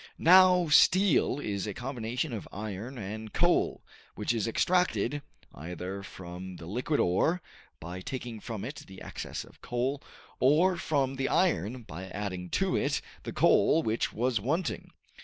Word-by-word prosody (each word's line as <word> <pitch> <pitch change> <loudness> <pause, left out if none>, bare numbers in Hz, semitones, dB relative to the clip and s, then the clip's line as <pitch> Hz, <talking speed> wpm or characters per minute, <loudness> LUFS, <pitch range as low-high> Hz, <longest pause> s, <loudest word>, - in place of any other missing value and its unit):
Now 180 0 +6
steel 185 -3 +5
is 100 -6 -3
a 105 - -4
combination 125 +2 -3
of 110 - -5
iron 110 +5 -6
and 110 +1 -6
coal, - - +2 0.3
which - - -1
is 115 -2 -1
extracted, 145 - +1 0.3
either 90 +5 -6
from 90 -1 -8
the 85 - -10
liquid 125 - -1
ore, 155 - +2 0.4
by 90 +3 -7
taking 120 +1 -5
from 110 -2 -5
it 140 +5 -6
the 95 -1 -11
excess - - -6
of - - -19
coal, 130 +4 -1 0.4
or 155 +8 +4
from 135 -5 0
the 135 - 0
iron 120 - +1
by 90 -1 -8
adding 95 -3 -5
to 190 - +1
it 140 0 +1 0.2
the - - -6
coal 160 +1 +4
which 110 +1 0
was 120 0 0
wanting. 160 - -2
120 Hz, 150 wpm, -29 LUFS, 100-145 Hz, 0.4 s, Now